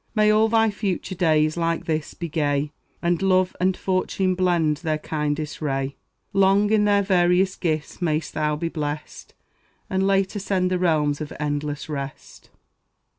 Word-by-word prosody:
May 215 Hz, -1 st, +4 dB
all 215 Hz, +1 st, +4 dB
thy 225 Hz, -1 st, +3 dB
future 195 Hz, -3 st, -3 dB
days, 155 Hz, -3 st, +2 dB
like 165 Hz, 0 st, -1 dB
this, 155 Hz, -2 st, -2 dB
be 170 Hz, -, -5 dB
gay, 145 Hz, -2 st, 0 dB, 0.3 s
And 170 Hz, +1 st, +1 dB
love 185 Hz, -1 st, +2 dB
and 185 Hz, +1 st, +1 dB
fortune 185 Hz, 0 st, 0 dB
blend 175 Hz, -5 st, +1 dB
their 155 Hz, -1 st, -1 dB
kindest 150 Hz, 0 st, -3 dB
ray; 135 Hz, -2 st, -2 dB, 0.4 s
Long 195 Hz, +2 st, +4 dB
in 215 Hz, -1 st, +4 dB
their 205 Hz, -1 st, +3 dB
various 185 Hz, 0 st, +3 dB
gifts 155 Hz, 0 st, -3 dB
mayst 155 Hz, -3 st, -1 dB
thou 150 Hz, -1 st, 0 dB
be 165 Hz, +3 st, -2 dB
blessed, 150 Hz, -2 st, -6 dB, 0.6 s
And 190 Hz, +1 st, +1 dB
late 195 Hz, +1 st, +1 dB
ascend 190 Hz, -2 st, 0 dB
the 180 Hz, -, +1 dB
realms 155 Hz, -4 st, +1 dB
of 155 Hz, -, -5 dB
endless 145 Hz, -1 st, -3 dB
rest. 140 Hz, -3 st, -7 dB
170 Hz, 155 wpm, -23 LUFS, 150-190 Hz, 0.6 s, May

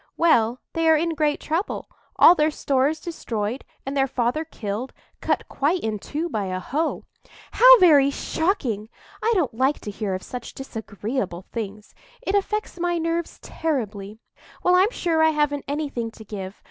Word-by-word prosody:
"Well, 245 Hz, -7 st, +3 dB
they 330 Hz, -1 st, +2 dB
are 320 Hz, -, +7 dB
in 330 Hz, +2 st, 0 dB
great 300 Hz, -2 st, +1 dB
trouble; 330 Hz, +6 st, -2 dB, 0.3 s
all -, -, +8 dB
their 305 Hz, -3 st, +2 dB
stores 285 Hz, +1 st, 0 dB
destroyed, 240 Hz, -8 st, -4 dB, 0.2 s
and 270 Hz, +1 st, -4 dB
their 270 Hz, -1 st, +2 dB
father 250 Hz, +4 st, 0 dB
killed—cut 230 Hz, -5 st, -4 dB
quite 325 Hz, +6 st, 0 dB
in 215 Hz, -2 st, -2 dB
two 310 Hz, -, -3 dB
by 215 Hz, -, -2 dB
a 185 Hz, -1 st, -3 dB
hoe." 290 Hz, -, -2 dB, 0.5 s
"How -, -, +9 dB
very 300 Hz, -, +6 dB
shocking! 275 Hz, -, -1 dB, 0.3 s
I 460 Hz, -, +2 dB
don't 325 Hz, -, +1 dB
like 260 Hz, +5 st, +1 dB
to 210 Hz, -, -5 dB
hear 200 Hz, -2 st, -3 dB
of 185 Hz, -, -6 dB
such 250 Hz, -2 st, -7 dB
disagreeable 220 Hz, -6 st, -4 dB
things; 210 Hz, -2 st, -6 dB, 0.3 s
it 385 Hz, -, -1 dB
affects 405 Hz, -1 st, -1 dB
my 345 Hz, 0 st, 0 dB
nerves 330 Hz, 0 st, -2 dB
terribly. 215 Hz, -10 st, -3 dB, 0.5 s
Well, 360 Hz, -, +4 dB
I'm 370 Hz, +3 st, +5 dB
sure 335 Hz, -8 st, 0 dB
I 320 Hz, -, +6 dB
haven't 295 Hz, -2 st, 0 dB
anything 280 Hz, -5 st, -3 dB
to 220 Hz, -1 st, -13 dB
give. 195 Hz, -2 st, -6 dB
280 Hz, 160 wpm, -24 LUFS, 220-325 Hz, 0.5 s, How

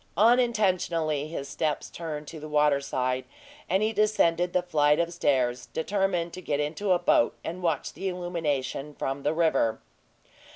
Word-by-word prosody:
Unintentionally 185 Hz, -, +2 dB
his 145 Hz, -3 st, -5 dB
steps 155 Hz, 0 st, -2 dB
turned 155 Hz, -3 st, -5 dB
to 160 Hz, -, -8 dB
the 155 Hz, +1 st, -8 dB
water 150 Hz, -2 st, +3 dB
side, 130 Hz, -2 st, -1 dB, 0.5 s
and 190 Hz, +3 st, +2 dB
he 220 Hz, +1 st, +1 dB
descended 180 Hz, -5 st, +2 dB
the 180 Hz, 0 st, +1 dB
flight 150 Hz, -4 st, +3 dB
of 170 Hz, 0 st, 0 dB
stairs, 125 Hz, -6 st, +1 dB
determined 180 Hz, -1 st, -1 dB
to 185 Hz, -, -7 dB
get 145 Hz, -4 st, -1 dB
into 155 Hz, +7 st, -1 dB
a 180 Hz, -, +5 dB
boat 175 Hz, -8 st, +3 dB
and 175 Hz, +3 st, -5 dB
watch 165 Hz, -5 st, -1 dB
the 195 Hz, -, -4 dB
illumination 150 Hz, -6 st, -3 dB
from 135 Hz, +1 st, -3 dB
the 145 Hz, -, +1 dB
river. 155 Hz, -9 st, +1 dB
165 Hz, 160 wpm, -27 LUFS, 145-180 Hz, 0.5 s, a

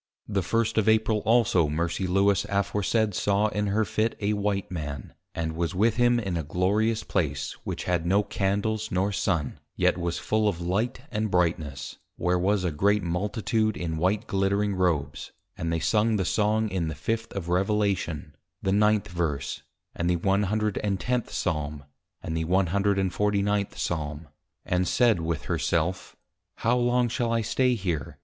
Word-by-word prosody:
_ -, -, -5 dB
The 100 Hz, -, +2 dB
first 115 Hz, +4 st, +1 dB
of 110 Hz, 0 st, +2 dB
April 110 Hz, 0 st, +3 dB
also 110 Hz, -9 st, +4 dB
Mercy 85 Hz, +4 st, -1 dB
Lewis 100 Hz, +1 st, +3 dB
aforesaid 100 Hz, +2 st, +1 dB
saw 100 Hz, +3 st, +2 dB
in 105 Hz, 0 st, -1 dB
her 105 Hz, +2 st, +1 dB
Fit 110 Hz, +3 st, 0 dB
a 105 Hz, 0 st, 0 dB
White 100 Hz, -3 st, -1 dB
Man, 75 Hz, -7 st, -5 dB, 0.2 s
and 80 Hz, -1 st, -2 dB
was 85 Hz, +2 st, -2 dB
with 110 Hz, +4 st, +2 dB
him 120 Hz, 0 st, +4 dB
in 95 Hz, -6 st, -2 dB
a -, -, -1 dB
glorious 100 Hz, +8 st, +1 dB
Place, 70 Hz, -7 st, -1 dB
which -, -, -4 dB
had 90 Hz, -2 st, 0 dB
no 100 Hz, +4 st, +3 dB
Candles 105 Hz, +3 st, -1 dB
nor 95 Hz, +3 st, +1 dB
Sun, 80 Hz, -7 st, -1 dB, 0.2 s
yet -, -, +2 dB
was 85 Hz, 0 st, -2 dB
full 110 Hz, 0 st, +1 dB
of 95 Hz, -5 st, -1 dB
Light 110 Hz, +9 st, -1 dB
and 110 Hz, 0 st, -1 dB
Brightness; 80 Hz, -6 st, -1 dB, 0.2 s
where 90 Hz, 0 st, +1 dB
was 100 Hz, +1 st, +1 dB
a 90 Hz, -, 0 dB
great 100 Hz, +7 st, +2 dB
Multitude 105 Hz, +5 st, 0 dB
in 80 Hz, -2 st, -3 dB
White 100 Hz, +7 st, +1 dB
glittering 100 Hz, +1 st, +1 dB
Robes, 90 Hz, -6 st, -1 dB, 0.2 s
and 85 Hz, 0 st, -3 dB
they 80 Hz, -, 0 dB
Sung 110 Hz, +7 st, +2 dB
the 95 Hz, -3 st, 0 dB
Song 110 Hz, +1 st, +1 dB
in 90 Hz, -4 st, -1 dB
the 80 Hz, -, -4 dB
fifth 115 Hz, +9 st, -3 dB
of 95 Hz, -4 st, -4 dB
Revelation, 90 Hz, -5 st, 0 dB, 0.3 s
the 95 Hz, -, +1 dB
9th 105 Hz, 0 st, +3 dB
verse, 80 Hz, -6 st, -2 dB, 0.3 s
and 85 Hz, +1 st, -1 dB
the 90 Hz, -, +3 dB
110 105 Hz, +4 st, 0 dB
Psalm, 75 Hz, -1 st, -2 dB, 0.4 s
and 80 Hz, -, -3 dB
the 80 Hz, 0 st, -1 dB
149 100 Hz, +2 st, +1 dB
Psalm; 75 Hz, -2 st, -3 dB, 0.4 s
and 90 Hz, 0 st, +1 dB
said 120 Hz, -7 st, +3 dB
with 80 Hz, -1 st, -2 dB
her -, -, -1 dB
self, 85 Hz, +2 st, -1 dB, 0.5 s
_How 120 Hz, +2 st, +2 dB
long 120 Hz, 0 st, +2 dB
shall 120 Hz, 0 st, -1 dB
I 115 Hz, 0 st, +2 dB
stay 125 Hz, +3 st, +2 dB
here! 85 Hz, -, -3 dB
100 Hz, 165 wpm, -26 LUFS, 85-105 Hz, 0.5 s, also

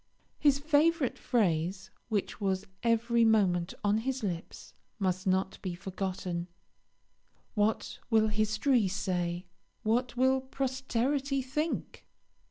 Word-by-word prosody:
His 285 Hz, -2 st, +4 dB
favourite 300 Hz, -1 st, +2 dB
phrase, 185 Hz, -3 st, 0 dB, 0.2 s
which 210 Hz, -1 st, -2 dB
was 190 Hz, 0 st, 0 dB, 0.2 s
every 230 Hz, 0 st, +3 dB
moment 195 Hz, -6 st, +3 dB
on 205 Hz, +1 st, +3 dB
his 265 Hz, +1 st, -2 dB
lips, 175 Hz, -4 st, -5 dB, 0.2 s
must 185 Hz, -2 st, -1 dB
not 190 Hz, 0 st, 0 dB
be 180 Hz, -3 st, -3 dB
forgotten 185 Hz, -2 st, -4 dB, 1.1 s
"What 210 Hz, 0 st, 0 dB
will 220 Hz, -2 st, +4 dB
history 215 Hz, +2 st, +2 dB
say 180 Hz, -2 st, -2 dB, 0.4 s
what 240 Hz, +3 st, 0 dB
will 260 Hz, +1 st, +3 dB
posterity 265 Hz, +1 st, -1 dB
think?" 300 Hz, +5 st, -3 dB
220 Hz, 105 wpm, -30 LUFS, 190-260 Hz, 1.1 s, His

